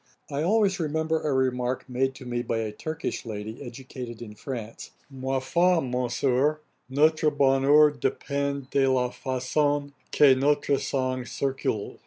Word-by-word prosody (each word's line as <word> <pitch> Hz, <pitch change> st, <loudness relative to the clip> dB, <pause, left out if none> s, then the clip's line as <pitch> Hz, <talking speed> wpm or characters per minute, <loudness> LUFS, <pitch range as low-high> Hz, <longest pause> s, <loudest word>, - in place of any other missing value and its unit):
I 140 Hz, +1 st, -1 dB
always 195 Hz, +2 st, +2 dB
remember 160 Hz, 0 st, 0 dB
a 150 Hz, -, -1 dB
remark 130 Hz, -1 st, 0 dB
made 130 Hz, +1 st, -1 dB
to 130 Hz, -, -11 dB
me 120 Hz, 0 st, -2 dB
by 115 Hz, -, -2 dB
a 110 Hz, -1 st, -2 dB
Turkish 155 Hz, +9 st, -4 dB
lady, 110 Hz, +1 st, -6 dB
educated 125 Hz, -2 st, -8 dB
in 110 Hz, -3 st, -8 dB
France, 115 Hz, -1 st, -7 dB, 0.2 s
'Ma 135 Hz, 0 st, -2 dB
foi, 170 Hz, +6 st, +2 dB
Monsieur, 130 Hz, +2 st, 0 dB, 0.3 s
notre 155 Hz, +3 st, +3 dB
bonheur 140 Hz, +2 st, +5 dB
dépend 140 Hz, -1 st, -2 dB
de 135 Hz, -1 st, +3 dB
la 125 Hz, -1 st, +1 dB
façon 145 Hz, +3 st, -1 dB, 0.2 s
que 145 Hz, -3 st, +6 dB
notre 140 Hz, +1 st, +2 dB
sang 130 Hz, -2 st, -1 dB
circule.' 130 Hz, -5 st, -3 dB
135 Hz, 140 wpm, -26 LUFS, 125-145 Hz, 0.3 s, que